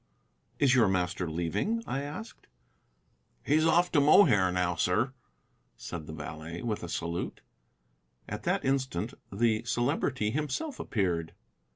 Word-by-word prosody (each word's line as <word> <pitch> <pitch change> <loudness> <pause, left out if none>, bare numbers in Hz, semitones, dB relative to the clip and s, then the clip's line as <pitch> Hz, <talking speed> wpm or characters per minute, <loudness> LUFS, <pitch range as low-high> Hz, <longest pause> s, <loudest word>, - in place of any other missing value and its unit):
"Is 135 -3 +4
your 125 -5 +5
master 90 -2 0
leaving?" 85 - -1
I 135 - -2
asked. 155 +11 -8 1.0
"He's 155 +3 +3
off 175 +2 +3
to 145 - +4
Mohair 120 - +6
now, 90 -1 +1
sir," 100 - +1 0.6
said 80 -3 -7
the - - -6
valet, 80 +2 -7
with 110 -3 -2
a 85 - -6
salute. 85 +1 -3 0.9
At - - -5
that - - 0
instant 130 -9 -1 0.2
the 110 +2 +1
Celebrity 120 -1 0
himself 155 - -3
appeared. 85 -6 -1
110 Hz, 130 wpm, -29 LUFS, 85-145 Hz, 1.0 s, Mohair